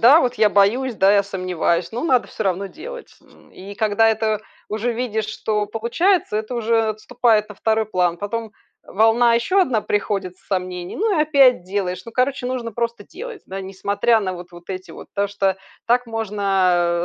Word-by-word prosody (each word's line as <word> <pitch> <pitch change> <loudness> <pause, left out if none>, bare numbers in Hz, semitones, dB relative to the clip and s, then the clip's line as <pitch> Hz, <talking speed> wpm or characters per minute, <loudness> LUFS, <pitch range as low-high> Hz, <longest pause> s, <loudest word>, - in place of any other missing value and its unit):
Да, 270 +8 +8
вот 250 -1 0
я 215 -2 +4
боюсь, 230 +6 +2
да, 195 -1 +4
я 200 - +4
сомневаюсь, 180 -3 -1
но 240 +8 -4
надо 255 -6 +2
всё 220 - -5
равно 195 +1 0
делать. 485 - -10 0.4
И 200 +2 -10
когда 220 +1 +3
это 220 -1 0 0.3
уже 220 +3 -1
видишь, 225 -3 -2
что 215 -1 -2
получается, 235 - +1
это 220 +3 -3
уже 225 -1 +1
отступает 215 0 +1
на 210 - -11
2 220 -1 +1
план. 180 -4 +1
Потом 220 +2 -4 0.3
волна 225 +3 +4
ещё 370 +12 +2
одна 255 -11 +2
приходит 195 -3 -2
с 195 - -30
сомнений, 180 -2 -3
ну 415 -3 +1
и 300 - +5
опять 270 - +4
делаешь. 185 -1 -3
Ну, 230 - -10
короче, 255 0 0
нужно 250 -2 -3
просто 235 0 -3
делать, 465 - -9
да, 195 +1 -6
несмотря 200 +4 +1
на 185 -2 -2
вот 175 +1 -10
вот 175 0 -14
эти 185 0 -6
вот. - - -11
Потому 200 0 -1
что 195 -1 0 0.3
так 245 +1 +2
можно, 195 -6 +1
215 Hz, 185 wpm, -21 LUFS, 195-240 Hz, 0.4 s, Да